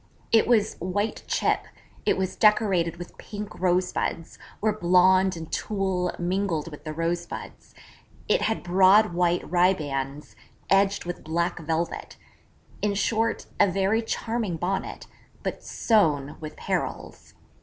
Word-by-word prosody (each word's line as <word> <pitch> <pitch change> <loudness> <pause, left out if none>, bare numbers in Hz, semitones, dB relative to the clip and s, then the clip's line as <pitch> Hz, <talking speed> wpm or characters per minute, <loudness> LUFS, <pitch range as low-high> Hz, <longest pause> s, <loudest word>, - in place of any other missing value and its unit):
It 225 - +5
was 220 -3 +2
white 200 +5 -2
chip; - - +1 0.4
it - - +3
was 190 -1 -2
decorated 190 -6 +3
with 175 0 -10
pink 210 0 -7
rosebuds, 180 -2 -1 0.2
where 215 0 +1
blonde 185 -1 +4
and 160 -1 -8
tulle 190 -3 -1
mingled 175 -3 -1
with 150 - -11
the 155 - -3
rosebuds; 170 +2 -4 0.5
it - - +3
had 220 - -1
broad 190 +3 +5
white 175 0 +1
ribands 150 -6 0 0.4
edged 195 0 +3
with 175 0 -5
black 170 +2 -1
velvet 165 +1 -3 0.6
in 205 -1 0
short, 225 +3 0
a - - +6
very 195 +4 +1
charming 225 -5 -2
Bonnet: 185 +4 -3 0.4
but - - -4
sown 150 - +1
with 155 -1 -8
perils. - - -4
180 Hz, 125 wpm, -26 LUFS, 170-205 Hz, 0.6 s, a